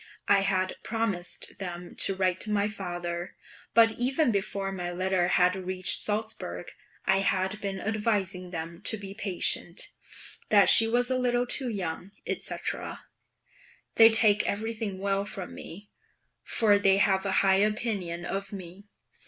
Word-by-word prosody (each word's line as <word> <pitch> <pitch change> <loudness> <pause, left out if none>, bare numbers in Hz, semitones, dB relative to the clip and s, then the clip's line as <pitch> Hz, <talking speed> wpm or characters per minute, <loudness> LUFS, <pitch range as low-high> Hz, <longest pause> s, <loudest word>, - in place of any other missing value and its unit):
I 200 - +5
had 185 -1 0
promised 220 -6 -2
them 175 -2 -7
to 195 - +4
write 185 -1 0
to 220 - 0
my 205 0 +1
father; 175 -4 -5 0.4
but 225 -1 +6
even 260 +2 +1
before 195 -1 -2
my 180 -2 -4
letter 185 0 0
had 180 +1 +3
reached 185 0 +1
Salzburg 215 +1 -4 0.3
I - - +3
had 195 +1 -1
been 195 -1 -4
advising 205 -4 -2
them 170 -1 -7
to 220 - +3
be 195 -1 -8
patient, 195 - 0 0.6
that 205 -2 +6
she 225 - +8
was 245 +2 +1
a 255 - +1
little 245 -1 +1
too 255 +1 0
young, 190 -2 -5
&c. - - -2 1.4
They 225 0 +8
take 215 -2 +4
everything 215 -1 -3
well 195 +1 -1
from 195 -2 -7
me, 205 +5 -10 0.5
for 205 -3 +2
they 195 -1 +4
have 195 -1 +2
a 195 - -2
high 190 0 +4
opinion 200 -5 -1
of 195 +2 -4
me. 190 +1 -10
195 Hz, 145 wpm, -27 LUFS, 185-215 Hz, 1.4 s, she